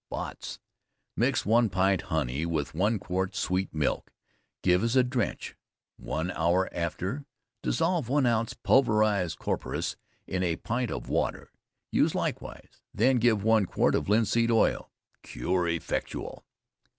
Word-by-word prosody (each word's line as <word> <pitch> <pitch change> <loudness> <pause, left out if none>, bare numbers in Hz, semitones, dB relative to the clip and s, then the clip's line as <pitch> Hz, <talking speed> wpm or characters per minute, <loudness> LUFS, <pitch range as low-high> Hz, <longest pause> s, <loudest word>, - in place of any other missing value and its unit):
Botts. - - -6 0.6
Mix - - +1
one 115 +2 +4
pint 95 0 +2
honey 75 -2 -1
with 80 -4 -2
one 105 +7 +1
quart 95 0 -2
sweet 95 +1 -1
milk, 75 -2 -1 0.5
give 90 +2 +3
as 115 +2 +1
a 130 - +6
drench, 125 -3 -2 0.4
one 80 +4 -3
hour 85 +3 +1
after, 90 - -3 0.3
dissolve 165 -6 0
1 140 0 +3
oz. 115 -1 +1
pulverized 105 -8 +3
Coperas - - -3 0.3
in 90 - -2
a 85 -3 +1
pint 120 +7 -2
of - - -5
water, - - -1 0.4
use - - +2
likewise, - - -5
then 125 +4 +4
give 110 -4 +3
one 110 -3 +3
quart - - +2
of - - 0
Linseed 115 +2 +3
Oil. 115 -1 +2 0.3
Cure 90 -1 -1
effectual. 85 -1 -3
100 Hz, 135 wpm, -28 LUFS, 90-115 Hz, 0.6 s, a